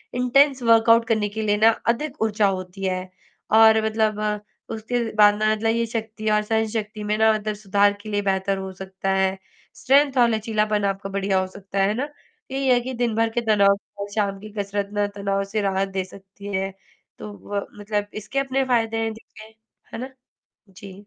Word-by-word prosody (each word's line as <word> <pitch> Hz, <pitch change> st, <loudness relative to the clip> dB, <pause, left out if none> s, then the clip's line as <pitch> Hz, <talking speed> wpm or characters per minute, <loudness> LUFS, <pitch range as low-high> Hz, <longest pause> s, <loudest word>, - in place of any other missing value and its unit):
Intense 260 Hz, +2 st, +3 dB
workout 230 Hz, 0 st, +5 dB
करने 215 Hz, -3 st, +1 dB
के 220 Hz, +2 st, -5 dB
लिए 210 Hz, -1 st, +1 dB
ना 220 Hz, +2 st, +6 dB, 0.2 s
अधिक 295 Hz, +3 st, -7 dB
ऊर्जा 215 Hz, -1 st, +2 dB
होती 185 Hz, +1 st, -9 dB
है। 185 Hz, 0 st, -2 dB, 0.5 s
और 220 Hz, 0 st, +6 dB
मतलब 220 Hz, -1 st, 0 dB, 0.5 s
उसके 225 Hz, +2 st, -3 dB, 0.2 s
बाद 210 Hz, -1 st, +6 dB
ना 215 Hz, +1 st, +1 dB
मतलब 225 Hz, +1 st, 0 dB
ये 230 Hz, 0 st, +1 dB
शक्ति 220 Hz, -1 st, -4 dB
और 210 Hz, 0 st, +3 dB
सहन 220 Hz, +1 st, 0 dB
शक्ति 215 Hz, -1 st, -4 dB
में 210 Hz, -, +1 dB
ना 220 Hz, 0 st, +5 dB
मतलब 215 Hz, 0 st, -3 dB
सुधार 205 Hz, 0 st, +2 dB
के 215 Hz, -, -9 dB
लिए 205 Hz, -1 st, 0 dB
बेहतर 195 Hz, 0 st, 0 dB
हो 190 Hz, 0 st, -5 dB
सकता 190 Hz, 0 st, -5 dB
है, 190 Hz, 0 st, +3 dB, 0.5 s
स्ट्रेंथ 275 Hz, +1 st, +3 dB
और 240 Hz, -1 st, +5 dB
लचीलापन 215 Hz, -2 st, 0 dB
आपका 195 Hz, 0 st, -2 dB
बढ़िया 195 Hz, -1 st, 0 dB
हो 185 Hz, -, -1 dB
सकता 195 Hz, 0 st, -5 dB
है, 195 Hz, -, +4 dB
है 205 Hz, -, +1 dB
ना? 260 Hz, +6 st, -2 dB, 0.4 s
यही 270 Hz, 0 st, -1 dB
है 250 Hz, -1 st, +5 dB
कि 260 Hz, +2 st, -5 dB
दिन 235 Hz, -2 st, -1 dB
भर 225 Hz, 0 st, +2 dB
के -, -, +3 dB
तनाव 200 Hz, -2 st, +4 dB, 0.2 s
और 200 Hz, -, -4 dB
शाम 200 Hz, -2 st, -1 dB
की 215 Hz, +2 st, -10 dB
कसरत 200 Hz, 0 st, -2 dB
ना 205 Hz, 0 st, +1 dB
तनाव 200 Hz, -1 st, -1 dB
से 215 Hz, -, +1 dB
राहत 195 Hz, -1 st, 0 dB
दे 190 Hz, -1 st, -2 dB
सकती 200 Hz, +1 st, -11 dB
है, 195 Hz, 0 st, -2 dB, 0.5 s
तो 210 Hz, -, -7 dB
वो 205 Hz, 0 st, -5 dB
मतलब 205 Hz, 0 st, -2 dB
इसके 215 Hz, +6 st, -3 dB
अपने 270 Hz, 0 st, 0 dB
फ़ायदे 225 Hz, -3 st, +1 dB
है 225 Hz, -, 0 dB
देखिए। 220 Hz, 0 st, -14 dB, 0.4 s
है -, -, -4 dB
ना? -, -, -10 dB, 0.6 s
जी। 190 Hz, +1 st, -12 dB
215 Hz, 200 wpm, -23 LUFS, 200-225 Hz, 0.6 s, ना